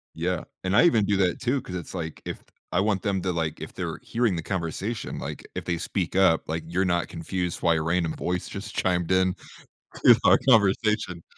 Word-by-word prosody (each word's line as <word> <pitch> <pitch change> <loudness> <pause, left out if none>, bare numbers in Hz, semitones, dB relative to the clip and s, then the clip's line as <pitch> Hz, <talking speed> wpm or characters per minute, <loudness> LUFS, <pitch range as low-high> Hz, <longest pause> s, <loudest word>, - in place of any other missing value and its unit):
Yeah, 85 +1 -1 0.2
and 95 +1 0
I - - +7
even 115 -11 +4
do 100 0 +1
that 90 -3 +1
too 125 +2 0
'cause 90 - -8
it's 85 -3 -6
like, 80 -4 -5
if - - -6 0.3
I - - +3
want 100 -1 +1
them 100 -4 -1
to, 90 - -1
like 80 -2 -2
if - - -7
they're - - -4
hearing 115 -5 0
the 85 - -2
conversation, 95 +5 -3
like, - - -6
if - - -4
they 85 - -1
speak 90 +2 -3
up, 95 -4 +4
like, 80 +1 -3
you're 90 +3 0
not 85 -1 +1
confused 90 +1 -4
why 85 -1 +3
a 80 - 0
random 80 0 0
voice 90 0 -2
just 100 +2 -7
chimed 90 -1 0
in 95 0 +3 0.7
to - - +10
our - - +7
conversation. 105 -5 +3
90 Hz, 210 wpm, -26 LUFS, 85-100 Hz, 0.7 s, to